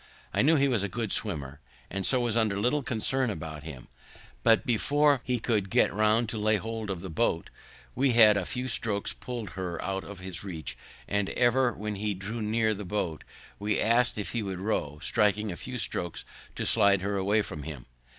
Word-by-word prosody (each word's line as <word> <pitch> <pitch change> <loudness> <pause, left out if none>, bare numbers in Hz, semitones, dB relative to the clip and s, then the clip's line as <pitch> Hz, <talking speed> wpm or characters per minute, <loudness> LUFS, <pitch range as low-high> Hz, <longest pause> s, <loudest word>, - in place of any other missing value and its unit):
I - - +3
knew 155 +5 +5
he 140 -2 +3
was 120 -6 +1
a 100 - -1
good 110 +1 -3
swimmer, 70 -9 -1 0.3
and 95 0 0
so 130 - +5
was 120 -2 0
under 110 -3 +2
little 125 +8 +1
concern 130 +1 +1
about 80 -6 -6
him; 75 -5 -9 0.5
but 110 - +4
before 145 +4 +3
he 125 -1 0
could 110 -4 0
get - - +3
round 110 +3 +3
to 110 - -4
lay 110 +1 +3
hold 110 0 -4
of 95 -3 -3
the 95 - -6
boat, 80 - 0 0.4
we 130 -1 +2
had 110 -3 +7
with 100 - +1
a - - -6
few 125 +1 -3
strokes 110 -4 0
pull'd 120 -7 -6
her 90 -2 -4
out 95 0 -3
of 100 - -9
his 95 0 -5
reach; 85 -6 -6 0.3
and 100 -1 0
ever 125 +1 +3
when 105 0 -4
he 105 0 -1
drew 105 +5 -5
near 110 +1 +1
the 105 0 -6
boat, 90 -5 -3 0.4
we 105 +1 0
ask'd 115 +1 +3
if 105 - -4
he 120 - -1
would 95 -3 -4
row, 90 -8 -2
striking 105 0 +2
a - - -5
few 125 +7 -6
strokes 85 -6 -3 0.3
to - - -3
slide 100 -3 +4
her 100 0 -1
away 100 +2 +2
from 80 -7 -7
him. 70 -4 -8
105 Hz, 210 wpm, -28 LUFS, 95-115 Hz, 0.5 s, had